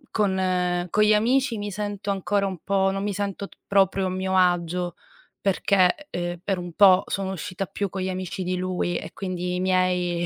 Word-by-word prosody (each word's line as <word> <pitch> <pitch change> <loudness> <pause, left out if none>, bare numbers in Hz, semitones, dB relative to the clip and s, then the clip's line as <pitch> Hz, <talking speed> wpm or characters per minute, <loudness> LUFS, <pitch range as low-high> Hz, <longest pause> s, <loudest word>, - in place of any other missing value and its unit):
con 185 -3 +1
con 210 +4 +3
gli 210 0 +5
amici 240 +2 +2
mi 205 0 -4
sento 205 0 -4
ancora 200 +1 0
un 185 -3 -5
po', 195 0 +2
non 195 +1 -3
mi 205 - -1
sento 200 0 -3
p - - -21
proprio 195 -1 +3
a - - 0
mio 190 0 -1
agio 175 -1 +1 0.5
perché, 195 +7 +2
ehm, 175 0 -4
per 195 -2 -1
un 175 -1 -6
po' 190 -1 +6
sono 190 -1 -2
uscita 185 +2 -4
più 200 +1 -3
con 190 +1 -5
gli 185 - -1
amici 185 0 -4
di 180 +1 -1
lui, 180 -1 -1
e - - -7
quindi 180 -2 -3
i - - -2
miei 180 -2 +1
190 Hz, 200 wpm, -24 LUFS, 180-200 Hz, 0.5 s, po